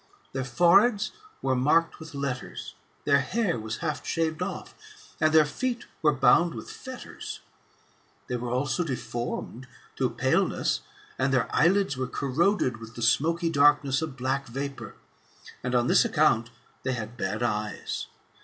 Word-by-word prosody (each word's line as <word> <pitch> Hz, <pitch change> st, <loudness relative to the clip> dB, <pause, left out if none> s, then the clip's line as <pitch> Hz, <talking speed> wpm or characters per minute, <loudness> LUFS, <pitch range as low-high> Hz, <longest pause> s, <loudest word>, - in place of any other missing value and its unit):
Their 130 Hz, -1 st, -2 dB
foreheads 200 Hz, -, +4 dB, 0.3 s
were 130 Hz, -1 st, +2 dB
marked 150 Hz, +6 st, +2 dB
with 160 Hz, -2 st, -10 dB
letters, 140 Hz, -2 st, -4 dB, 0.3 s
their 140 Hz, -1 st, +5 dB
hair 185 Hz, -, 0 dB
was 110 Hz, +1 st, -4 dB
half 155 Hz, -2 st, -2 dB
shaved 165 Hz, -1 st, -1 dB
off, 190 Hz, +2 st, -4 dB, 0.5 s
and 155 Hz, -, +4 dB
their 155 Hz, -1 st, +6 dB
feet 240 Hz, +10 st, -3 dB, 0.2 s
were 150 Hz, -, +5 dB
bound 150 Hz, +4 st, +4 dB
with 110 Hz, -, -7 dB
fetters. -, -, -8 dB, 0.8 s
They 125 Hz, -, -3 dB
were 120 Hz, 0 st, -3 dB
also 130 Hz, +7 st, 0 dB
deformed, 125 Hz, -2 st, -4 dB, 0.3 s
through -, -, -1 dB
paleness, -, -, +1 dB, 0.4 s
and 130 Hz, +1 st, +2 dB
their 125 Hz, -5 st, +2 dB
eyelids 180 Hz, -3 st, +3 dB
were 130 Hz, -1 st, -1 dB
corroded 140 Hz, -, +1 dB
with 115 Hz, 0 st, -11 dB
the 120 Hz, -, -4 dB
smoky 165 Hz, +7 st, +2 dB
darkness 145 Hz, -1 st, +4 dB
of 155 Hz, -4 st, -4 dB
black 135 Hz, +2 st, -1 dB
vapour; 135 Hz, +3 st, -5 dB, 0.7 s
and 125 Hz, 0 st, -1 dB
on 120 Hz, -1 st, +3 dB
this -, -, +5 dB
account 115 Hz, +2 st, +2 dB, 0.3 s
they 130 Hz, -, -1 dB
had 115 Hz, -1 st, -5 dB
bad 105 Hz, 0 st, -2 dB
eyes. 105 Hz, -2 st, -2 dB
140 Hz, 145 wpm, -27 LUFS, 125-165 Hz, 0.8 s, their